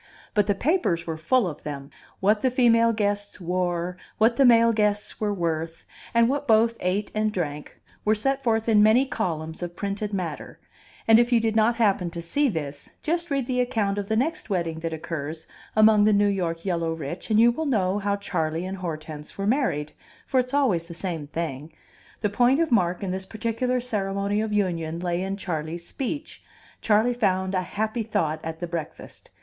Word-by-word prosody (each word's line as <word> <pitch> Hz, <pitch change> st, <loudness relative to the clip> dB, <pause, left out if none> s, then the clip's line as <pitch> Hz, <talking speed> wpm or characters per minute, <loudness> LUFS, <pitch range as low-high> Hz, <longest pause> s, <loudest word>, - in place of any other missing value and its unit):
But 210 Hz, -2 st, +2 dB
the 205 Hz, -, +2 dB
papers 245 Hz, -, +1 dB
were 165 Hz, -, -3 dB
full 190 Hz, +8 st, +2 dB
of 150 Hz, -3 st, -6 dB
them; 140 Hz, -1 st, -7 dB, 0.3 s
what 210 Hz, +2 st, +3 dB
the 260 Hz, -, +3 dB
female 230 Hz, -2 st, +4 dB
guests 205 Hz, -2 st, -1 dB
wore, 180 Hz, 0 st, -1 dB, 0.2 s
what 225 Hz, +2 st, +4 dB
the 275 Hz, -, +4 dB
male 230 Hz, -1 st, +6 dB
guests 210 Hz, -1 st, 0 dB
were 210 Hz, -1 st, +1 dB
worth, 165 Hz, -3 st, -3 dB, 0.3 s
and 235 Hz, 0 st, +4 dB
what 285 Hz, +2 st, -1 dB
both 225 Hz, 0 st, +4 dB
ate 190 Hz, +3 st, -1 dB
and 215 Hz, 0 st, +1 dB
drank, 150 Hz, -6 st, -4 dB, 0.2 s
were 215 Hz, +1 st, +3 dB
set 270 Hz, +5 st, 0 dB
forth 225 Hz, -2 st, +1 dB
in 215 Hz, -2 st, +5 dB
many 220 Hz, +5 st, +5 dB
columns 160 Hz, -, -3 dB
of 175 Hz, 0 st, -5 dB
printed 200 Hz, +2 st, -3 dB
matter; 175 Hz, -7 st, -5 dB, 0.5 s
and 225 Hz, 0 st, +7 dB
if 240 Hz, +1 st, +2 dB
you 240 Hz, -, +5 dB
did 225 Hz, -1 st, 0 dB
not 225 Hz, +2 st, +3 dB
happen 200 Hz, -6 st, +2 dB
to 170 Hz, 0 st, -7 dB
see 270 Hz, -, +1 dB
this, 145 Hz, -7 st, -5 dB
just 340 Hz, +2 st, -1 dB
read 275 Hz, -3 st, 0 dB
the 250 Hz, 0 st, 0 dB
account 220 Hz, -5 st, 0 dB
of 200 Hz, -, -4 dB
the 220 Hz, -, 0 dB
next 280 Hz, +3 st, -1 dB
wedding 170 Hz, -4 st, -1 dB
that 165 Hz, 0 st, -3 dB
occurs 160 Hz, 0 st, -5 dB, 0.3 s
among 215 Hz, -1 st, +6 dB
the 215 Hz, -, +4 dB
New 205 Hz, 0 st, +4 dB
York 175 Hz, -4 st, -1 dB
yellow 170 Hz, -3 st, 0 dB
rich, 165 Hz, +4 st, -6 dB
and 215 Hz, 0 st, +4 dB
you 235 Hz, +1 st, +6 dB
will 315 Hz, +6 st, -3 dB
know 200 Hz, -6 st, +1 dB
how 200 Hz, 0 st, 0 dB
Charley 165 Hz, -4 st, -2 dB
and 190 Hz, +1 st, -5 dB
Hortense 155 Hz, -3 st, -6 dB
were 195 Hz, -, -2 dB
married; 210 Hz, -, 0 dB, 0.3 s
for 260 Hz, -, +1 dB
it's 250 Hz, 0 st, -1 dB
always 250 Hz, -, +2 dB
the 170 Hz, 0 st, -10 dB
same 170 Hz, -5 st, -4 dB
thing. 155 Hz, -1 st, -4 dB, 0.5 s
The 210 Hz, -, +1 dB
point 245 Hz, +6 st, +3 dB
of 330 Hz, -3 st, +1 dB
mark 180 Hz, -4 st, +2 dB
in 190 Hz, -, -2 dB
this 190 Hz, +1 st, -4 dB
particular 230 Hz, +4 st, -1 dB
ceremony 200 Hz, -3 st, -1 dB
of 220 Hz, -1 st, -2 dB
union 170 Hz, -5 st, -1 dB
lay 175 Hz, 0 st, -1 dB
in 195 Hz, +1 st, -3 dB
Charley's 170 Hz, -2 st, -4 dB
speech; 290 Hz, +3 st, -5 dB, 0.4 s
Charley 220 Hz, +3 st, +3 dB
found 190 Hz, -5 st, 0 dB
a 185 Hz, -, +1 dB
happy 215 Hz, +5 st, -2 dB
thought 160 Hz, -8 st, -1 dB
at 160 Hz, 0 st, -5 dB
the 175 Hz, -, -3 dB
breakfast. 165 Hz, -2 st, -7 dB
200 Hz, 195 wpm, -25 LUFS, 170-230 Hz, 0.5 s, and